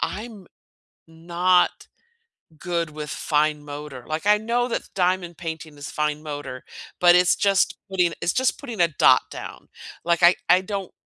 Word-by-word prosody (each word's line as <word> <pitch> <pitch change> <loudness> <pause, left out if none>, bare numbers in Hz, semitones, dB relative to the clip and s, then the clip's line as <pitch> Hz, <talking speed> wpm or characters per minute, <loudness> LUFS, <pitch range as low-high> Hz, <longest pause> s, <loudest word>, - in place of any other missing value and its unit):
I'm 210 -4 -5 0.6
not 175 +2 +1 0.7
good 170 -2 -3
with 150 -1 -7
fine 150 0 0
motor. 145 -3 -8
Like, 155 +4 -4
I 210 0 +6
know 235 +3 -1
that - - -2
diamond 180 -2 0
painting 160 -3 -7
is 145 - -7
fine 150 0 -1
motor, 145 -4 -7 0.4
but 175 0 +6
it's 180 0 +4
just 200 -2 +2
putting 180 -3 +1
it's 175 - +1
just 260 +1 0
putting 240 -8 -8
a 170 - +5
dot 155 - +4
down. - - -9 0.4
Like, 170 0 +1
I 175 +1 +7
I 180 +1 +5
don't 195 -1 -5
175 Hz, 155 wpm, -23 LUFS, 150-190 Hz, 0.7 s, I